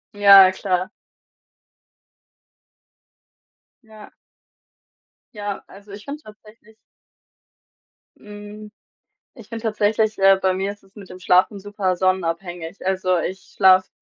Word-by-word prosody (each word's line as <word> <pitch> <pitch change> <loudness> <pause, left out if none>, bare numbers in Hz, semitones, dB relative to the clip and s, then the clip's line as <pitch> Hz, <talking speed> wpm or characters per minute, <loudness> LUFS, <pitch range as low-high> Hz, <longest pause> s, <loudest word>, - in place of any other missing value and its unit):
Ja, 195 -2 +7
klar. 185 0 -2 2.9
Ja. 220 -2 -16 1.2
Ja, 205 -1 -6
also, 200 +1 -16
ich 205 +1 -11
finde 290 +2 -8
tatsächlich 215 0 -18 1.4
Hm, 210 0 -12 0.6
ich 230 -3 -15
finde 230 0 -8
tatsächlich, 215 0 0
äh, 195 0 +5
bei 190 -1 +1
mir 195 +2 -3
ist 205 - -15
es 195 +2 -26
mit 200 -3 -13
dem 180 - -11
Schlafen 185 +3 +2
super 200 -2 -3
sonnenabhängig. 175 -1 -3
Also, 185 -1 0
ich 185 +3 -6
schlafe 185 -1 +4
200 Hz, 105 wpm, -21 LUFS, 185-210 Hz, 2.9 s, Ja